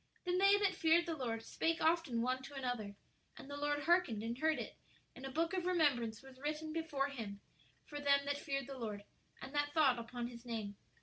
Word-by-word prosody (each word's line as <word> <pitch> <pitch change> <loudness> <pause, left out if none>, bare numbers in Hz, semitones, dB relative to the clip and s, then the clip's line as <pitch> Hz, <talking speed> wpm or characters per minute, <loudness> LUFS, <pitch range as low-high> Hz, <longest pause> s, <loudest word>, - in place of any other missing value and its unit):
"Then 360 0 +2
they 395 +1 +7
that 405 -2 +2
feared 335 0 +4
the 335 -2 -2
Lord 230 -5 -2
spake 330 +6 0
often 320 -8 +2
one 255 +1 0
to 275 +2 -9
another; 245 -6 -3 0.4
and - - -9
the 285 - -5
Lord 290 0 0
hearkened, 315 - +3
and 230 +1 -2
heard 315 +4 +2
it; - - -5 0.4
and 270 - -6
a - - -5
book 330 +6 0
of 365 -1 0
remembrance 275 -10 +2
was 265 -1 -13
written 305 +2 -3
before 300 -4 0
Him 220 -7 -6 0.5
for 290 - -6
them 280 -1 +4
that 285 0 -1
feared 275 -3 -2
the 270 0 -7
Lord, 210 -3 -4 0.4
and 270 - -7
that 290 0 +1
thought 270 -6 +5
upon 235 +1 -4
His 235 -1 -10
name. 220 -4 -4
280 Hz, 210 wpm, -37 LUFS, 240-320 Hz, 0.5 s, they